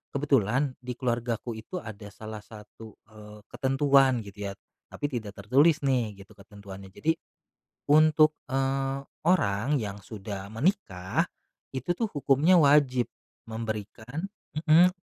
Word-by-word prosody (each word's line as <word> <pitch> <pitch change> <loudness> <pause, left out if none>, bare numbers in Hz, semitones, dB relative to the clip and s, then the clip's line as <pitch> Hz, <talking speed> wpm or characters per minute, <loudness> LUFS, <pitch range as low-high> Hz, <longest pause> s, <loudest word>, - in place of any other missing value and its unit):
kebetulan 135 -1 +2
di 125 0 -5
keluargaku 120 -2 -2
itu 115 - -9
ada 105 -2 -8
salah 110 +1 -8
satu, 105 +1 -13 0.2
eee, 105 0 -12
ketentuan 135 -2 +3
gitu 100 0 -7
ya, 100 - -4 0.3
tapi 145 0 -4
tidak 110 -5 -5
tertulis 140 +10 +3
nih 115 -7 0
gitu 100 - -23
ketentuannya. 100 -1 -11
Jadi 150 +12 0 0.8
untuk, 155 +1 +5 0.2
eee, 135 0 0 0.3
orang 140 - +2
yang 100 -2 -4
sudah 100 -1 -7
menikah, 110 - 0 0.5
itu 130 +3 -5
tuh 230 - +1
hukumnya 145 +4 +4
wajib 140 -4 +4 0.4
memberikan 110 - -5 0.2
mhm, 165 +4 +5
125 Hz, 120 wpm, -28 LUFS, 105-145 Hz, 0.8 s, untuk